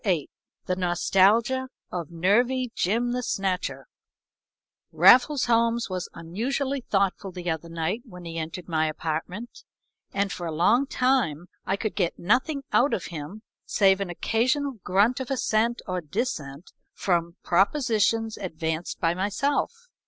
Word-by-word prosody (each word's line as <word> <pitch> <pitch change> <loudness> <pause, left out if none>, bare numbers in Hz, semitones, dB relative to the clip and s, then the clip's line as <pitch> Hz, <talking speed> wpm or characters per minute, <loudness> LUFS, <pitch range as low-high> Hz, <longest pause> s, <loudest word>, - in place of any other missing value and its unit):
VIII 180 - 0 0.3
"THE 185 - 0
NOSTALGIA 195 +8 +3 0.2
OF 170 -4 -4
NERVY 235 +9 +1
JIM 235 +6 +1
THE 250 +1 -1
SNATCHER" 195 -5 -2 1.1
Raffles 260 +3 +6
Holmes 230 -2 +2
was 185 -1 -3
unusually 260 +11 -2
thoughtful 195 -2 0
the 180 -1 -3
other 160 +1 -4
night 165 +7 -2
when 180 -6 -11
he 165 0 -5
entered 165 +3 -6
my 160 -2 +1
apartment, 165 +9 -5 0.5
and 200 -1 0
for 175 -1 -4
a - - -3
long 210 - +3
time 240 - +1 0.2
I 195 - +1
could 215 0 -2
get 180 -4 -1
nothing 260 - +1
out 275 +4 +4
of - - -5
him 165 +8 -7 0.2
save 195 -1 +3
an 195 - -2
occasional 255 - 0
grunt 205 +8 +2
of 260 - -5
assent 235 -2 0
or 185 -1 -2
dissent 155 - -4 0.2
from 170 -2 0
propositions 225 - +2
advanced 160 -3 -4
by 165 -1 +2
myself. 205 +10 0
195 Hz, 135 wpm, -26 LUFS, 175-240 Hz, 1.1 s, Raffles